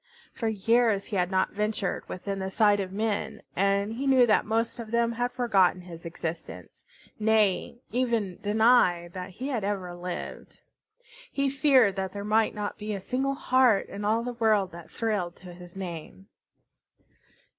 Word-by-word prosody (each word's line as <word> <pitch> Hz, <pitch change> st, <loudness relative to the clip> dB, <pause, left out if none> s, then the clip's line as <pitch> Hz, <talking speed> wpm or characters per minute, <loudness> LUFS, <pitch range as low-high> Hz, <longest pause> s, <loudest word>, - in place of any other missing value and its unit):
For 230 Hz, -, -3 dB
years 220 Hz, 0 st, +2 dB
he 210 Hz, -, -5 dB
had 180 Hz, -1 st, +1 dB
not 190 Hz, -1 st, +1 dB
ventured 210 Hz, -1 st, -2 dB
within 190 Hz, +1 st, -4 dB
sight 205 Hz, 0 st, +3 dB
of 190 Hz, -2 st, -3 dB
men, 215 Hz, +1 st, -2 dB
and 200 Hz, +2 st, +1 dB
he 270 Hz, +4 st, -3 dB
knew 260 Hz, -2 st, +6 dB
that 215 Hz, -2 st, +2 dB
most 230 Hz, +2 st, -1 dB
of 225 Hz, -2 st, -6 dB
them 235 Hz, 0 st, +1 dB
had 245 Hz, +1 st, -1 dB
forgotten 195 Hz, -8 st, +2 dB
his 170 Hz, -2 st, -9 dB
existence, 165 Hz, 0 st, -7 dB, 0.4 s
nay, 215 Hz, +1 st, +1 dB
even 230 Hz, -7 st, -1 dB
denied 205 Hz, -5 st, +3 dB
that 185 Hz, 0 st, -6 dB
he 255 Hz, +9 st, -6 dB
had 240 Hz, -7 st, -2 dB
ever 195 Hz, -3 st, -2 dB
lived. 175 Hz, 0 st, -7 dB, 0.7 s
He 275 Hz, -1 st, 0 dB
feared 265 Hz, -8 st, +4 dB
that 190 Hz, -1 st, -3 dB
there 200 Hz, 0 st, -5 dB
might 220 Hz, +1 st, +2 dB
not 210 Hz, -1 st, -4 dB
be 210 Hz, 0 st, -3 dB
a -, -, -4 dB
single 265 Hz, +7 st, -1 dB
heart 255 Hz, -6 st, +3 dB
in 205 Hz, -, -6 dB
all 220 Hz, +3 st, +1 dB
the 245 Hz, 0 st, -4 dB
world 215 Hz, -5 st, +2 dB
that 170 Hz, 0 st, -11 dB
thrilled 205 Hz, -7 st, -2 dB
to 180 Hz, -1 st, -12 dB
his 175 Hz, 0 st, -13 dB
name. 165 Hz, -, -7 dB
210 Hz, 165 wpm, -27 LUFS, 185-230 Hz, 0.7 s, knew